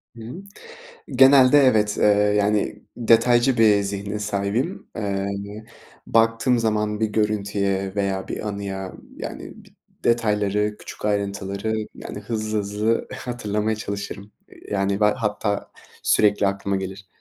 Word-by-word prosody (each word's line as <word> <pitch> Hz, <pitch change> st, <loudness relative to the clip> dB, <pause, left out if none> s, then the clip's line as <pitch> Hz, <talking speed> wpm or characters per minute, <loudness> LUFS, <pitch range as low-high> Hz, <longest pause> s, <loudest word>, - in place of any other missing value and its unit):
Hı 115 Hz, -, -11 dB
hı. 160 Hz, -, -8 dB, 0.7 s
Genelde 135 Hz, +1 st, +7 dB
evet, 110 Hz, -7 st, +3 dB
eee, -, -, +2 dB, 0.3 s
yani, 105 Hz, 0 st, 0 dB
detaycı 120 Hz, +2 st, +4 dB
bir 105 Hz, -3 st, +5 dB
zihne 100 Hz, +1 st, -4 dB
sahibim. 105 Hz, -, -2 dB
Eee, -, -, -3 dB
hani, 100 Hz, +1 st, -3 dB, 0.4 s
baktığım 115 Hz, +2 st, +3 dB
zaman 105 Hz, -1 st, 0 dB
bir 110 Hz, -, +3 dB
görüntüye 100 Hz, -2 st, -1 dB
veya 100 Hz, -1 st, -2 dB
bir 105 Hz, -, -4 dB
anıya, 95 Hz, -2 st, -5 dB, 0.2 s
yani, -, -, -7 dB
bi -, -, -18 dB, 0.4 s
detayları, 105 Hz, -2 st, +1 dB
küçük -, -, -10 dB
ayrıntıları, 100 Hz, 0 st, -2 dB, 0.2 s
yani, 100 Hz, -, -8 dB
hızlı 110 Hz, 0 st, -2 dB
hızlı 105 Hz, +3 st, -1 dB
hatırlamaya 110 Hz, -3 st, -2 dB
çalışırım. 100 Hz, -1 st, -6 dB, 0.2 s
Eee, -, -, -17 dB
yani, 100 Hz, 0 st, 0 dB
be -, -, +4 dB
hatta 105 Hz, -1 st, 0 dB, 0.3 s
sürekli 105 Hz, -1 st, +3 dB
aklıma 100 Hz, 0 st, -1 dB
gelir. 95 Hz, 0 st, -6 dB
105 Hz, 125 wpm, -23 LUFS, 100-110 Hz, 0.7 s, Genelde